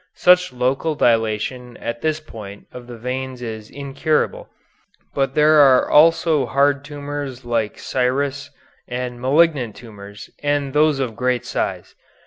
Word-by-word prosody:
Such 180 Hz, -2 st, +4 dB
local 130 Hz, +5 st, -1 dB
dilatation 115 Hz, +1 st, 0 dB
at 115 Hz, 0 st, -5 dB
this 155 Hz, -1 st, 0 dB
point 105 Hz, -9 st, -11 dB
of 125 Hz, -1 st, -11 dB
the 120 Hz, -1 st, -9 dB
veins 130 Hz, +1 st, -5 dB
is 110 Hz, -2 st, -7 dB
incurable, 140 Hz, +3 st, -2 dB, 0.6 s
but 135 Hz, -1 st, -1 dB
there 155 Hz, 0 st, +5 dB
are 135 Hz, -3 st, +6 dB
also 155 Hz, -3 st, +4 dB
hard 140 Hz, +2 st, +2 dB
tumors 145 Hz, -3 st, -6 dB
like 115 Hz, -3 st, -1 dB
scirrhus 140 Hz, +2 st, -1 dB, 0.4 s
and 125 Hz, 0 st, -5 dB
malignant 140 Hz, -4 st, +2 dB
tumors, 105 Hz, -3 st, -12 dB
and 145 Hz, -2 st, -1 dB
those 150 Hz, -1 st, +3 dB
of 125 Hz, -5 st, -2 dB
great 125 Hz, 0 st, -1 dB
size. -, -, -3 dB
130 Hz, 130 wpm, -20 LUFS, 120-145 Hz, 0.6 s, are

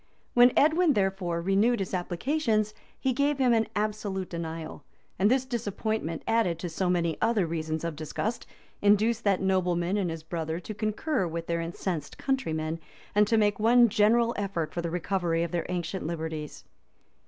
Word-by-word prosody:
When 245 Hz, +1 st, +7 dB
Edwin, 315 Hz, +2 st, +4 dB
therefore, 190 Hz, -5 st, -1 dB
renewed 200 Hz, +6 st, +3 dB
his 195 Hz, -1 st, -3 dB
applications, 215 Hz, -, 0 dB, 0.3 s
he 265 Hz, -1 st, +1 dB
gave 285 Hz, +2 st, +1 dB
him 255 Hz, -3 st, +3 dB
an 225 Hz, -1 st, +2 dB
absolute 205 Hz, -3 st, -2 dB
denial;[*] 165 Hz, -1 st, -5 dB, 0.4 s
and 200 Hz, +2 st, +4 dB
this 260 Hz, +1 st, +2 dB
disappointment, 220 Hz, -, -3 dB
added 225 Hz, -8 st, +2 dB
to 175 Hz, +1 st, -5 dB
so 180 Hz, +3 st, -1 dB
many 170 Hz, -3 st, 0 dB
other 225 Hz, -5 st, +2 dB
reasons 160 Hz, -1 st, -3 dB
of 170 Hz, -2 st, -3 dB
disgust, 180 Hz, +9 st, -3 dB, 0.3 s
induced 215 Hz, +3 st, +3 dB
that 195 Hz, -2 st, +2 dB
nobleman 180 Hz, 0 st, +1 dB
and 190 Hz, -4 st, 0 dB
his 165 Hz, -1 st, -6 dB
brother 160 Hz, 0 st, -3 dB
to 200 Hz, +4 st, -7 dB
concur 215 Hz, -, -1 dB
with 165 Hz, 0 st, -4 dB
their 170 Hz, 0 st, -1 dB
incensed 170 Hz, -2 st, -4 dB
countrymen, 160 Hz, -, -1 dB, 0.3 s
and 210 Hz, 0 st, +4 dB
to 225 Hz, -, +3 dB
make 205 Hz, -1 st, +2 dB
one 235 Hz, +2 st, +6 dB
general 230 Hz, +3 st, +3 dB
effort 195 Hz, -6 st, -2 dB
for 170 Hz, -, -2 dB
the 170 Hz, -, -3 dB
recovery 175 Hz, -1 st, 0 dB
of 170 Hz, -, -3 dB
their 175 Hz, -1 st, -2 dB
ancient 180 Hz, -1 st, -3 dB
liberties. 160 Hz, -2 st, -5 dB
195 Hz, 165 wpm, -28 LUFS, 170-225 Hz, 0.4 s, When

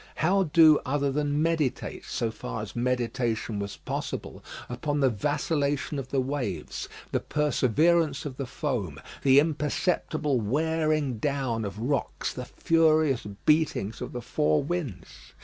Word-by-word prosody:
how 190 Hz, +4 st, +2 dB
do 160 Hz, -2 st, +7 dB
other 140 Hz, +1 st, 0 dB
than 145 Hz, +1 st, 0 dB
meditate, 160 Hz, -5 st, -1 dB
so 115 Hz, -1 st, -2 dB
far 110 Hz, -1 st, -5 dB
as 105 Hz, -, -9 dB
meditation 120 Hz, -3 st, -1 dB
was 100 Hz, 0 st, -5 dB
possible, -, -, -5 dB, 0.2 s
upon 145 Hz, +4 st, -2 dB
the 135 Hz, -2 st, +4 dB
vacillation 145 Hz, +4 st, -1 dB
of 130 Hz, -, -6 dB
the 135 Hz, -, +1 dB
waves, 130 Hz, -, -3 dB, 0.2 s
the -, -, +1 dB
perseverance 150 Hz, +2 st, +2 dB
of 130 Hz, -3 st, -5 dB
the 135 Hz, -, -4 dB
foam, 125 Hz, -, -3 dB, 0.2 s
the 135 Hz, 0 st, +6 dB
imperceptible 150 Hz, -2 st, 0 dB
wearing 155 Hz, +1 st, 0 dB
down 130 Hz, -4 st, -1 dB
of 100 Hz, 0 st, -5 dB
rocks, 130 Hz, +5 st, -2 dB
the 125 Hz, -, -6 dB
furious 155 Hz, -6 st, +2 dB, 0.2 s
beatings 150 Hz, -9 st, +2 dB
of 125 Hz, -, -4 dB
the 120 Hz, -1 st, -6 dB
four 75 Hz, -7 st, +1 dB
winds? 140 Hz, -, -5 dB
140 Hz, 135 wpm, -27 LUFS, 120-155 Hz, 0.2 s, do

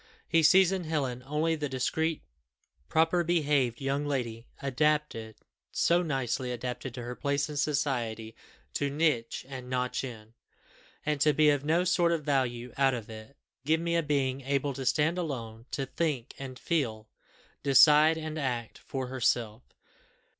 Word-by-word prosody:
He 165 Hz, -1 st, +3 dB
sees 185 Hz, +4 st, +6 dB
in 190 Hz, -3 st, -2 dB
Helen 135 Hz, -6 st, -2 dB
only 155 Hz, +3 st, +1 dB
the 150 Hz, -2 st, -3 dB
discreet 160 Hz, +5 st, -1 dB, 0.7 s
proper 165 Hz, +2 st, +3 dB
behaved 145 Hz, -8 st, +1 dB
young 140 Hz, +1 st, -1 dB
lady, 120 Hz, -5 st, -3 dB
adapted, 140 Hz, -5 st, 0 dB, 0.4 s
so 170 Hz, +1 st, +3 dB
nicely 130 Hz, -5 st, -2 dB
adapted 125 Hz, +1 st, -5 dB
to 125 Hz, -, -6 dB
her 120 Hz, +1 st, -5 dB
place 140 Hz, +2 st, -1 dB
in 150 Hz, -, -6 dB
society, 125 Hz, -7 st, -1 dB, 0.4 s
to 145 Hz, -, 0 dB
nitch 140 Hz, -7 st, 0 dB
and 130 Hz, -2 st, -8 dB
notch 125 Hz, 0 st, -1 dB
in, 115 Hz, -3 st, -8 dB, 0.7 s
and 150 Hz, -2 st, -1 dB
to 150 Hz, 0 st, +5 dB
be 150 Hz, +1 st, +5 dB
of 145 Hz, -1 st, 0 dB
no 165 Hz, +4 st, +2 dB
sort 180 Hz, -2 st, +2 dB
of 165 Hz, -3 st, 0 dB
value 125 Hz, -4 st, -1 dB
out 135 Hz, -1 st, +3 dB
of 115 Hz, -2 st, -7 dB
it. 110 Hz, +5 st, -11 dB, 0.3 s
Give 160 Hz, +3 st, +2 dB
me 170 Hz, 0 st, -1 dB
a 170 Hz, -, +3 dB
being 140 Hz, -3 st, 0 dB
able 140 Hz, +1 st, -1 dB
to 130 Hz, -1 st, -4 dB
stand 160 Hz, +6 st, +2 dB
alone, 115 Hz, -8 st, -5 dB
to 135 Hz, -, -2 dB
think 135 Hz, -3 st, -2 dB
and 130 Hz, -2 st, -7 dB
feel, 115 Hz, -11 st, -1 dB, 0.5 s
decide 150 Hz, +3 st, +6 dB
and 155 Hz, 0 st, -4 dB
act, 120 Hz, -5 st, -3 dB
for 135 Hz, -1 st, -4 dB
herself. 120 Hz, -3 st, 0 dB
140 Hz, 155 wpm, -29 LUFS, 125-155 Hz, 0.7 s, sees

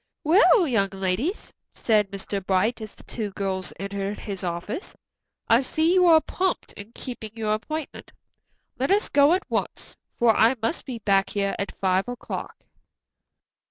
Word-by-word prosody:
"Well, 360 Hz, +3 st, +5 dB
young 210 Hz, -7 st, +1 dB
ladies," 195 Hz, -, -2 dB, 0.2 s
said 210 Hz, -3 st, +2 dB
Mr. 195 Hz, 0 st, -4 dB
Bright, 195 Hz, +6 st, +1 dB
as 215 Hz, -2 st, -8 dB
the -, -, -14 dB
two 215 Hz, -3 st, -4 dB
girls 190 Hz, -2 st, -2 dB
entered 200 Hz, +1 st, -3 dB
his 195 Hz, -3 st, -6 dB
office, 180 Hz, -, -4 dB, 0.5 s
"I 230 Hz, +2 st, +5 dB
see 315 Hz, +5 st, +1 dB
you 365 Hz, -1 st, +5 dB
are 325 Hz, -2 st, +7 dB
prompt 370 Hz, +3 st, -2 dB
in 205 Hz, +2 st, -11 dB
keeping 240 Hz, -4 st, -7 dB
your 215 Hz, -2 st, -1 dB
appointment. 305 Hz, +8 st, -5 dB, 0.7 s
Let 270 Hz, -, 0 dB
us 405 Hz, +2 st, +2 dB
go 285 Hz, +3 st, +5 dB
at 370 Hz, -, +1 dB
once, -, -, -3 dB, 0.2 s
for 230 Hz, -2 st, +4 dB
I 230 Hz, +4 st, +4 dB
must 230 Hz, +10 st, -2 dB
be 250 Hz, -3 st, -4 dB
back 195 Hz, -3 st, +2 dB
here 200 Hz, -1 st, -1 dB
at 200 Hz, -, -4 dB
five 190 Hz, +2 st, +1 dB
o'clock." 245 Hz, -1 st, -6 dB
220 Hz, 160 wpm, -25 LUFS, 195-285 Hz, 0.7 s, are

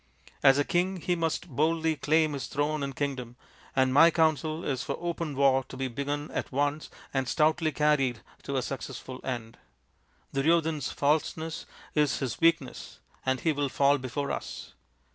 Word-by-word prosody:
As 135 Hz, -1 st, +6 dB
a 145 Hz, -, +3 dB
king 185 Hz, +4 st, 0 dB
he 180 Hz, +1 st, -1 dB
must 165 Hz, +1 st, -1 dB
boldly 160 Hz, +2 st, +1 dB
claim 155 Hz, +1 st, +2 dB
his 135 Hz, -3 st, -4 dB
throne 150 Hz, +1 st, -1 dB
and 135 Hz, -1 st, -3 dB
kingdom, 130 Hz, -4 st, -3 dB, 0.4 s
and 130 Hz, -1 st, +3 dB
my 165 Hz, +5 st, +8 dB
counsel 160 Hz, 0 st, +1 dB
is 135 Hz, -2 st, -1 dB
for -, -, -3 dB
open 170 Hz, -3 st, -3 dB
war 135 Hz, -1 st, +4 dB
to 130 Hz, -, -10 dB
be 135 Hz, 0 st, -1 dB
begun 145 Hz, +4 st, -3 dB
at -, -, -3 dB
once 145 Hz, +3 st, -1 dB, 0.2 s
and 135 Hz, -2 st, 0 dB
stoutly 155 Hz, 0 st, +2 dB
carried 145 Hz, -6 st, +2 dB, 0.2 s
to 140 Hz, -, -4 dB
a 130 Hz, -, 0 dB
successful 130 Hz, 0 st, -6 dB
end. 120 Hz, -3 st, -5 dB, 0.7 s
Duryodhan's 155 Hz, +1 st, +1 dB
falseness 160 Hz, +2 st, -1 dB, 0.3 s
is 150 Hz, -2 st, +2 dB
his 120 Hz, -4 st, -4 dB
weak 165 Hz, -1 st, +5 dB
ness, 130 Hz, -, -10 dB, 0.3 s
and 130 Hz, 0 st, +1 dB
he 160 Hz, -, +2 dB
will 145 Hz, -1 st, -1 dB
fall 140 Hz, +2 st, +3 dB
before 135 Hz, +2 st, -3 dB
us. -, -, -6 dB
145 Hz, 165 wpm, -28 LUFS, 135-160 Hz, 0.7 s, my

